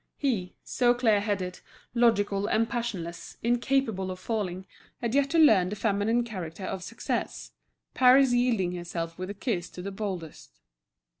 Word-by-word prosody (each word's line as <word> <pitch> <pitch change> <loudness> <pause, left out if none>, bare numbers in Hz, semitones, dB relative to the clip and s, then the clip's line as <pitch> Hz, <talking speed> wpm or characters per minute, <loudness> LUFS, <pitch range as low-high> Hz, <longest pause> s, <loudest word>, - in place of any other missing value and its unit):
He, 220 -11 -1
so 245 -1 +2
clear 225 -4 +3
headed, 195 -3 -2 0.3
logical 205 -4 +2
and 225 +1 +2
passionless, 200 -9 -5
incapable 235 -5 +1
of 185 - -5
falling, 190 -3 -3 0.3
had 235 -1 -2
yet 280 0 +3
to 330 - +1
learn 215 - +6
the 210 - -4
feminine 215 +3 +1
character 185 -6 -7
of 190 0 -4
success, 230 - -4 0.4
Paris 260 0 +6
yielding 240 -7 +2
herself 170 -1 -5
with 185 +1 -4
a 205 - -5
kiss 195 -5 -2
to 180 - -9
the 200 - -4
boldest. 165 - -6
205 Hz, 150 wpm, -28 LUFS, 185-240 Hz, 0.4 s, learn